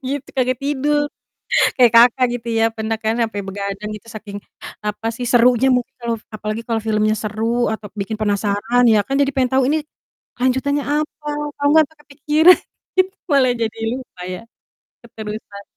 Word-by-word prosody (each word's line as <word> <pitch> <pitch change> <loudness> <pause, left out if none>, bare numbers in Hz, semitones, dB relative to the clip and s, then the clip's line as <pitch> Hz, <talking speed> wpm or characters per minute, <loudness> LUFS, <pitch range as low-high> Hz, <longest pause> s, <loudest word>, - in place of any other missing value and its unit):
gitu, 280 -1 -4
kagak 255 0 +1
tidur" 290 +1 +1 0.8
kayak, 245 -3 +6
Kakak, 240 +2 +6
gitu 235 0 -13
ya, 225 - +4
pernah 220 0 -2
kan 220 0 -1
sampai 225 -3 -1
begadang 200 +1 -5
gitu 210 +2 -13
saking, 205 -1 -7 0.5
apa 210 +2 -3
sih, 245 - -4
serunya 245 +1 +5
mungkin 250 +1 -1
kalau 235 -1 -1 0.2
apalagi 215 +1 -4
kalau 230 -1 0
filmnya 215 0 +1
seru 225 +3 -1
atau 215 -1 -7
bikin 210 +2 -3
penasaran 210 +3 +1
ya 215 -2 +5
kan? 275 - -2
Jadi 280 0 +2
pengen 260 -2 +2
tahu, 265 0 +4
"Ini, 310 - +2 0.6
lanjutannya 265 +3 +1
apa?" 300 +1 -3 0.3
Kalo 285 - -1
nggak 315 0 +6
sampai 315 -2 -24
kepikiran, 305 +4 +4 0.4
gitu 370 0 +4 0.2
malah 265 -3 +4
jadi 225 -2 -3 0.2
lupa 255 -8 -10
ya, 185 +2 -5 0.7
keterusan. 215 -2 -8
235 Hz, 165 wpm, -19 LUFS, 215-270 Hz, 0.8 s, kayak